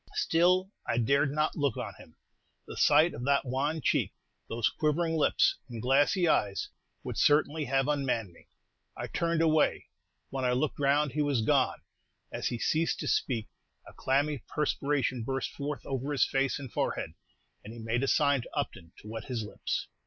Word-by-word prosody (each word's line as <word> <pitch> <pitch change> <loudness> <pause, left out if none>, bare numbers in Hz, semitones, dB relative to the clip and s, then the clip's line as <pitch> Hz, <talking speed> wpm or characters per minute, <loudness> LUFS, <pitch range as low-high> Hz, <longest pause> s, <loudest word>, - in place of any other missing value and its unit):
Still, 185 - +2 0.2
I 115 - 0
dared 140 +5 +3
not 150 +1 0
look 140 -6 0
on - - -4
him. - - -15 0.5
The - - -9
sight 155 +3 +4
of 120 - -6
that 140 0 +2
wan 140 +5 -1
cheek, - - +1 0.4
those 115 -1 +1
quivering 160 +2 0
lips 385 - +3
and 120 -2 -6
glassy 145 - +3
eyes, 100 - +1 0.3
would - - -5
certainly 150 +1 +3
have 135 +1 +1
unmanned 130 -10 -1
me. - - -20 0.5
I - - -3
turned 170 -1 0
away. 155 -2 +2 0.4
When 135 -1 -3
I 125 -1 +2
looked 135 +4 -1
round, 145 +1 +2
he 150 - -1
was 140 -6 +1
gone!' - - +1 0.5
As - - -2
he 120 - -2
ceased 160 +7 0
to - - -3
speak, 115 -5 0 0.4
a - - -12
clammy 140 +2 0
perspiration 140 -4 -1
burst 135 +3 -2
forth 140 -3 -5
over 135 +1 -3
his 140 - +3
face 135 0 0
and 135 -4 -9
forehead, - - -2 0.5
and 105 - -9
he 115 - -10
made 115 +2 -1
a 135 - 0
sign 145 -2 +3
to - - -11
Upton 85 0 -4
to - - -11
wet 110 +1 -6
his 120 -4 -3
lips. 105 - -3
140 Hz, 180 wpm, -29 LUFS, 125-150 Hz, 0.5 s, sight